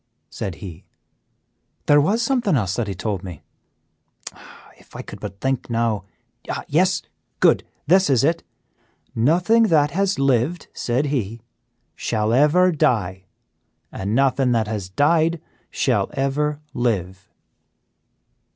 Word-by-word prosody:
said 95 - -5
he, 90 0 -10 1.0
"there 145 0 +5
was 215 +10 +1
something 235 - +1
else 100 -7 0
that 120 -3 -2
he 100 - -4
told 100 0 -3
me. 90 -6 -9 0.8
Tschk! - - -10 0.4
If - - -21
I - - -6
could - - -10
but 100 - -8
think 135 +2 -2
now. 115 -4 -1 0.6
Yes, 180 +3 +2 0.4
good! - - +4 0.2
This 185 +3 +4
is 135 -2 +3
it 165 +3 +1 0.7
'Nothing 180 - +3
that 150 -5 +3
has 195 +3 0
lived,' 135 +5 0
said 125 +4 -1
he, 115 -3 -3 0.5
'shall 110 -1 -1
ever 155 +8 +4
die, 95 - 0 0.7
and 100 +3 -3
nothing 135 -1 +2
that 115 -2 +1
has 105 -4 -4
died 160 - +2 0.3
shall - - 0
ever 145 +2 -1
live. 95 -6 -2
130 Hz, 125 wpm, -21 LUFS, 105-160 Hz, 1.0 s, there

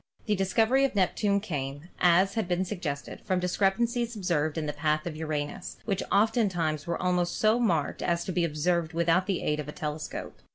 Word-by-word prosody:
The 210 - +1
discovery 220 +8 +3
of 270 -5 +1
Neptune 200 +1 +2
came, 145 -4 -5
as 180 +3 +4
has 220 -2 0
been 180 +1 0
suggested, 165 -8 -5
from 185 -1 0
discrepancies 230 +6 +1
observed 165 -6 0
in 160 - -1
the 150 - -2
path 155 +1 0
of 170 -3 -4
Uranus, 155 -2 -4
which 200 -4 -1
oftentimes 190 -9 +1
were 170 - -1
almost 180 -1 0
so 220 +2 +3
marked 170 -11 0
as 170 0 0
to - - -3
be 180 -1 +1
observed 165 +1 0
with 170 0 0
out 185 +3 +3
the 195 -3 -1
aid 150 0 0
of 150 - -4
the - - -5
telescope. 150 0 -5
175 Hz, 195 wpm, -28 LUFS, 155-200 Hz, -, as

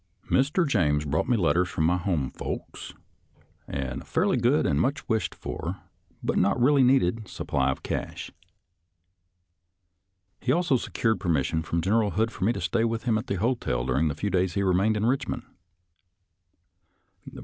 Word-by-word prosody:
Mr. 150 +6 +2
James 75 - +1
brought 75 - -1
me 120 - +3
letters 90 -1 +2
from 80 - -1
my 85 +3 +3
home 85 -7 -1
folks, - - -6 0.7
and 65 -3 -4
a - - -14
fairly - - +1
good - - +2
and 70 +2 +2
much 140 +3 -1
wished 110 -7 -1
for, 90 +5 -5 0.5
but - - +1
not 100 +6 +2
really 140 +3 +4
needed, 115 -5 +3
supply 65 -6 -1
of 65 - -3
cash. - - -4 2.1
He 125 - 0
also 165 -2 +2
secured 115 -1 -1
permis 80 -7 +1
sion 80 0 -1
from 85 +1 -2
General 105 +4 +2
Hood 110 +3 0
for 95 - -6
me 115 - +3
to 100 - -5
stay 110 +6 0
with 115 0 -1
him 120 -3 +1
at 110 - -2
the 100 - -1
hotel 95 - -1
during 70 +5 +1
the 75 - -2
few 100 - -2
days 90 0 +1
he 100 - +1
remained 95 +4 +2
in 105 - -1
Eichmond. 130 0 -1
100 Hz, 170 wpm, -26 LUFS, 80-115 Hz, 2.1 s, really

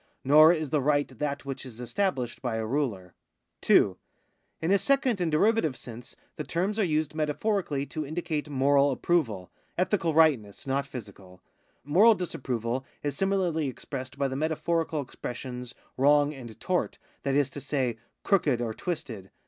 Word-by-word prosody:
Nor 155 +4 +8
is 155 -5 -1
the 150 - +2
right 145 +1 +2
that 140 +2 -4
which 135 -1 -5
is 125 -3 -11
established 130 - -2
by 120 -4 -2
a 110 0 -2
ruler. 110 -8 -2 0.5
2. - - +4 0.6
In 160 +3 0
a 200 - +5
second 265 -6 +2
and 170 -2 0
derivative 160 - +2
sense 120 0 -10 0.2
the 155 - -3
terms 190 +8 -1
are - - +4
used 155 -3 0
metaphorically 155 -1 -1
to 155 +2 -4
indicate 155 0 -3
moral 140 +1 +3
approval 125 - 0
— - - -40
ethical 175 -3 +1
Tightness, 140 -12 +3
not 140 0 -1
physical. 95 -7 -10 0.4
Moral 195 - +6
dis 180 -4 -4
approval 125 0 -2 0.2
is 145 -1 -2
similarly 185 -6 0
expressed 130 0 -6
by 140 -1 +1
the 130 - -4
metaphorical 160 +1 -1
expressions 125 -1 -7 0.2
wrong 145 +2 +4
and 120 -6 -10
tort, 180 -1 -1 0.2
that 140 -1 -1
is 145 -2 +2
to 145 - -7
say, 125 -5 -1 0.2
crooked 150 - +2
or 115 -2 -2
twisted. 115 - -5
145 Hz, 160 wpm, -28 LUFS, 125-165 Hz, 0.6 s, Nor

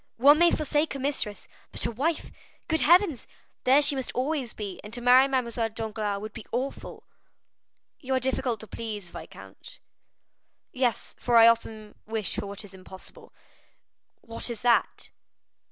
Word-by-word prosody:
One 285 +5 +6
may 345 0 +6
forsake 300 -1 0
a - - -5
mistress, 265 -7 -3 0.2
but - - -2
a - - -1
wife,—good 320 +4 -2
heavens! 340 - +4 0.4
There 270 +3 +5
she 285 - +3
must 265 -2 -4
always 265 -2 -1
be; 200 -3 -7
and 210 - -10
to - - -4
marry 250 +2 +6
Mademoiselle 235 -4 -1
Danglars 215 -2 -3
would 215 - -7
be 225 - -9
awful." 260 +3 -4 1.0
"You 265 -2 -2
are - - +2
difficult 255 -2 -1
to 220 - -9
please, 210 -4 -7
viscount." - - -11 0.9
"Yes, 250 -2 -1
for 240 -1 +2
I 230 - +9
often 220 -2 0
wish 220 -2 -2
for 205 -1 -4
what 200 +1 -5
is 195 - -14
impossible." 190 0 -13 0.9
"What 230 +1 -4
is 235 -2 -6
that?" 240 -1 +1
235 Hz, 155 wpm, -27 LUFS, 215-270 Hz, 1.0 s, I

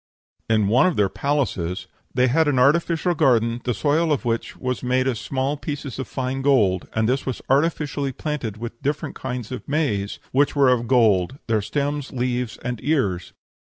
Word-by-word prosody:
In 110 -2 +3
one 125 - +4
of 180 - 0
their 100 -2 +2
palaces 110 - -1 0.3
"they 125 - +2
had 155 +5 +3
an 145 -3 +2
artificial 165 +6 +3
garden, 120 -6 +2
the 125 - +1
soil 155 +2 +1
of 140 -3 0
which 115 -1 -2
was 125 0 -3
made 130 +1 +1
of 130 -2 +1
small 135 +5 -2
pieces 145 -3 -5
of 130 - -4
fine 130 0 -3
gold, 110 -10 +2
and 110 0 +2
this 130 +3 +1
was 130 - -2
artificially 145 -1 +1
planted 130 -6 -4
with 115 +1 -7
different 145 +1 -2
kinds 125 -3 -5
of 130 - -6
maize, 110 -10 0
which 145 +3 +2
were 140 -2 +5
of 120 -2 +1
gold, 110 -3 +3
their 110 -2 +1
stems, 145 +5 -2
leaves, 125 -2 -2
and 125 -2 -3
ears. 105 - 0
130 Hz, 180 wpm, -23 LUFS, 115-145 Hz, 0.3 s, were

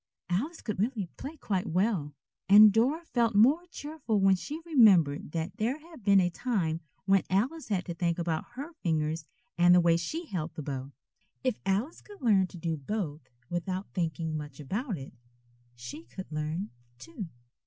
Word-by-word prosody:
Alice 285 - -1
could 215 -4 -3
really 210 -4 -1
play 305 +4 -7
quite 195 -6 -2
well, 175 -5 0 0.3
and 210 +1 +9
Dora 270 +10 +2
felt 235 -7 +1
more 280 - +5
cheerful 290 -9 -2
when 195 0 +5
she 295 - -6
remembered 190 - +5
that 165 +3 -3
there 235 +5 0
had 315 -5 -15
been 200 -1 +6
a 175 -1 +2
time 170 -7 -1 0.2
when 195 -1 +4
Alice 255 +12 0
had 195 -4 -1
to 170 - -4
think 170 0 0
about 165 -2 -1
her 285 +7 -7
fingers 155 -1 0 0.3
and 175 +1 +7
the - - +7
way 170 -1 +4
she 320 - -4
held 170 - -4
the 155 - -5
bow. 135 -1 -5 0.5
If 255 -4 0
Alice 210 - 0
could 410 -1 -14
learn 205 -7 +4
to 180 - -11
do 165 -1 -2
both 155 0 -4 0.2
without 185 +4 -3
thinking 160 -2 -2
much 150 -2 -6
about 200 - -3
it, 135 -1 -9 0.6
she 120 -2 -8
could 160 +9 -9
learn, 155 +6 -3 0.3
too. 165 - -7
190 Hz, 175 wpm, -29 LUFS, 165-235 Hz, 0.6 s, and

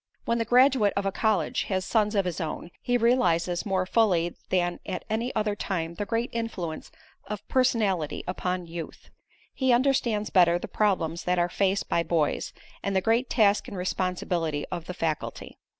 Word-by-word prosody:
When 235 0 +1
the 230 - 0
graduate 250 -3 +4
of 200 - 0
a 195 - +1
college 200 -5 0
has 185 -1 -1
sons 215 -1 +1
of 200 -2 +2
his 175 -2 -3
own, 165 +2 -5
he 245 0 +1
realizes 180 -7 +2
more 190 -1 +1
fully 185 -5 +2
than 175 -1 0
at 190 - -5
any 230 +3 -1
other 210 -1 0
time 170 -5 -3
the 205 +3 -4
great 230 +2 -1
influence 195 -9 -4 0.4
of 210 -1 -6
personality 215 - +1
upon 180 0 -2
youth. 165 -1 -8 0.4
He 260 -1 +1
understands 240 -4 +2
better 175 -2 +5
the - - -6
problems 175 -6 0
that 180 0 +1
are 175 0 +2
faced 195 +2 0
by 170 - +1
boys, 165 -3 0 0.3
and 200 -1 -2
the - - +5
great 230 +5 +1
task 210 -3 +3
and 195 - -7
responsibility 180 -4 -1
of 175 -3 -4
the 180 - -5
faculty. 160 -3 -4
190 Hz, 175 wpm, -27 LUFS, 175-225 Hz, 0.4 s, better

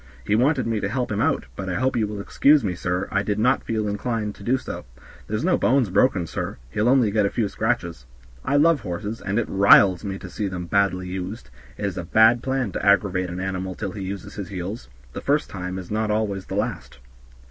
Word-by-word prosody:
He 105 - 0
wanted 130 +3 +2
me 115 -2 0
to 100 - -2
help 125 +1 -2
him 100 - 0
out, - - +1
but 95 -1 -5
I 90 - -2
hope 130 +1 0
you 110 -3 +1
will 105 -1 -6
excuse 140 +7 +4
me, 95 -4 -1
sir, 90 +2 -2
I 100 - +2
did 105 0 -2
not 120 +4 +2
feel 110 -2 -1
inclined 105 0 -2
to - - -16
do 125 +5 +2
so. - - -7 0.4
There's 110 +5 -2
no 180 +1 +2
bones 125 -6 +2
broken, 100 -3 +3
sir; 80 - -5
he'll 105 - +1
only 125 -5 +4
get 105 -1 +2
a - - -1
few 110 -1 -1
scratches. 90 - -2 0.4
I 140 - 0
love 155 +1 +4
horses, 105 +2 -5
and 100 +2 -2
it 120 - 0
riles 95 -1 +6
me 95 -2 -4
to 95 - -9
see 95 +4 -3
them 90 -2 -5
badly 95 0 +1
used; 95 +5 -6 0.3
it - - -3
is 100 -2 -3
a - - -4
bad 110 +7 +5
plan 130 -5 -1
to - - -4
aggravate 95 -2 +2
an 90 +1 -5
animal 95 -1 -3
till 100 -3 -4
he 100 - -7
uses 95 -1 -6
his 100 -3 -6
heels; 95 - -6 0.2
the - - -5
first 145 +2 0
time 90 -1 -5
is 95 0 -8
not 110 0 0
always 105 -3 -1
the - - -5
last." - - -3
100 Hz, 235 wpm, -23 LUFS, 95-115 Hz, 0.4 s, riles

